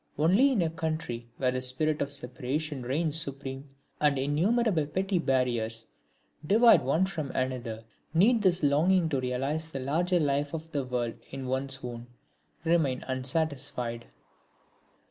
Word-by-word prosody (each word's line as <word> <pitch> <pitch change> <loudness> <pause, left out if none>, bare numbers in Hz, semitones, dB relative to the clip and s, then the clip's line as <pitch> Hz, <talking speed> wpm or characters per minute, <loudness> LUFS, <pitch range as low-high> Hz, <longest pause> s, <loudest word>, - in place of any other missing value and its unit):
Only 190 - +4
in 215 -9 +2
a 165 - 0
country 155 -8 -4
where 130 -1 +1
the 130 0 -2
spirit 150 +5 0
of 140 - 0
separation 140 +2 -3
reigns 155 +5 +1
supreme, 135 -1 -6 0.3
and 145 -2 +3
innumerable 165 - +1
petty 190 +4 0
barriers 120 -6 0 0.6
divide 225 +9 +6
one 155 +8 +2
from 160 -7 -4
another, 125 -4 -2 0.3
need 215 +8 +4
this 185 -4 +2
longing 165 +5 +3
to 135 -4 0
realise 135 +6 -2
the 135 - -5
larger 170 +7 +1
life 145 0 0
of 160 0 -7
the 145 -3 -1
world 125 -2 -3
in 135 -1 -6
one's 130 +1 0
own 120 -1 -6 0.6
remain 160 -6 +2
unsatisfied. 130 -3 -2
145 Hz, 140 wpm, -29 LUFS, 130-165 Hz, 0.6 s, divide